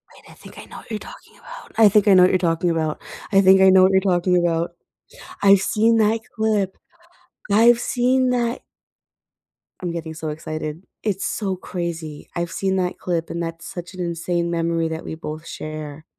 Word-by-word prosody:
Wait, -, -, -18 dB
I -, -, -14 dB
think -, -, -15 dB
I -, -, -10 dB
know -, -, -12 dB
what -, -, -13 dB
you're 215 Hz, -, -4 dB
talking -, -, -14 dB
about. -, -, -13 dB
I 220 Hz, -2 st, +7 dB
think 210 Hz, +1 st, +3 dB
I 200 Hz, -, +7 dB
know 185 Hz, -, +7 dB
what 180 Hz, -, +5 dB
you're 185 Hz, -, +2 dB
talking 170 Hz, 0 st, 0 dB
about. 160 Hz, -2 st, -2 dB, 0.3 s
I 195 Hz, -, +5 dB
think 190 Hz, 0 st, +6 dB
I 190 Hz, -, +7 dB
know 190 Hz, 0 st, +6 dB
what 190 Hz, -, +5 dB
you're 190 Hz, 0 st, +3 dB
talking 180 Hz, -1 st, +2 dB
about. 170 Hz, -1 st, 0 dB, 0.7 s
I've 200 Hz, -1 st, +6 dB
seen 225 Hz, +4 st, +2 dB
that 220 Hz, +1 st, +2 dB
clip. 215 Hz, -4 st, 0 dB, 0.8 s
I've 230 Hz, +3 st, +5 dB
seen 255 Hz, +1 st, +1 dB
that. 240 Hz, -1 st, -1 dB, 1.2 s
I'm 180 Hz, -2 st, -3 dB
getting 165 Hz, -1 st, -5 dB
so 155 Hz, 0 st, -5 dB
excited. 155 Hz, +1 st, -6 dB, 0.2 s
It's 195 Hz, -3 st, -2 dB
so 195 Hz, -3 st, -2 dB
crazy. 170 Hz, -4 st, -6 dB
I've 170 Hz, -1 st, -3 dB
seen 190 Hz, -1 st, -1 dB
that 180 Hz, -1 st, -2 dB
clip 170 Hz, -2 st, -2 dB
and 170 Hz, -, -4 dB
that's 165 Hz, 0 st, -6 dB
such 175 Hz, +1 st, -8 dB
an 185 Hz, -, -11 dB
insane 170 Hz, 0 st, -2 dB
memory 165 Hz, -1 st, 0 dB
that 160 Hz, 0 st, -6 dB
we -, -, -5 dB
both 155 Hz, 0 st, -7 dB
share. 155 Hz, 0 st, -7 dB
180 Hz, 195 wpm, -21 LUFS, 165-200 Hz, 1.2 s, I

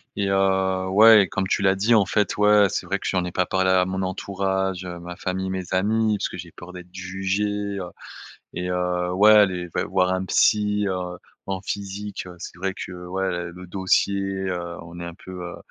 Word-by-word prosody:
et, 100 Hz, -1 st, -1 dB
heu, 95 Hz, -1 st, +1 dB
ouais, 105 Hz, 0 st, +7 dB
comme 95 Hz, -1 st, -1 dB
tu -, -, 0 dB
l'as 95 Hz, -1 st, +3 dB
dit, 105 Hz, +5 st, +2 dB
en 105 Hz, -, +4 dB
fait, 105 Hz, +2 st, 0 dB
ouais. 105 Hz, 0 st, +5 dB
C'est -, -, -3 dB
vrai 100 Hz, -, -1 dB
que -, -, -5 dB
j'en 90 Hz, -2 st, 0 dB
ai 90 Hz, -, -4 dB
pas 90 Hz, 0 st, +1 dB
parlé 95 Hz, +1 st, +1 dB
à 90 Hz, -1 st, +4 dB
mon 95 Hz, +1 st, -3 dB
entourage, 95 Hz, 0 st, -2 dB
ma 85 Hz, 0 st, -7 dB
famille, 95 Hz, +1 st, -3 dB
mes 95 Hz, -1 st, -3 dB
amis, 110 Hz, +3 st, +2 dB
parce 100 Hz, -, -2 dB
que -, -, -8 dB
j'ai 85 Hz, 0 st, -9 dB
peur 90 Hz, +3 st, -12 dB
d'être 90 Hz, 0 st, -11 dB
jugé, 95 Hz, +2 st, -2 dB, 0.4 s
heu 90 Hz, -2 st, -5 dB, 0.6 s
et, 90 Hz, +1 st, -4 dB
heu, 90 Hz, 0 st, -1 dB
ouais, 105 Hz, +1 st, +7 dB
les 90 Hz, -1 st, -4 dB
v -, -, -2 dB
voir 90 Hz, 0 st, +1 dB
un 95 Hz, 0 st, -1 dB
psy, 105 Hz, +1 st, +2 dB
heu, 90 Hz, -1 st, -4 dB, 0.3 s
en 95 Hz, -1 st, -3 dB
physique, 100 Hz, 0 st, -5 dB
c'est 85 Hz, -, -9 dB
vrai 95 Hz, +1 st, -2 dB
que, -, -, -7 dB
ouais, 90 Hz, -2 st, -2 dB
le 90 Hz, +1 st, -10 dB
dossier, 95 Hz, +1 st, +1 dB, 0.3 s
heu, 85 Hz, -1 st, -4 dB
on 85 Hz, +1 st, -10 dB
est -, -, -5 dB
un 85 Hz, 0 st, -7 dB
peu, 95 Hz, -, -12 dB
heu, 85 Hz, -, -7 dB
95 Hz, 205 wpm, -23 LUFS, 90-100 Hz, 0.6 s, ouais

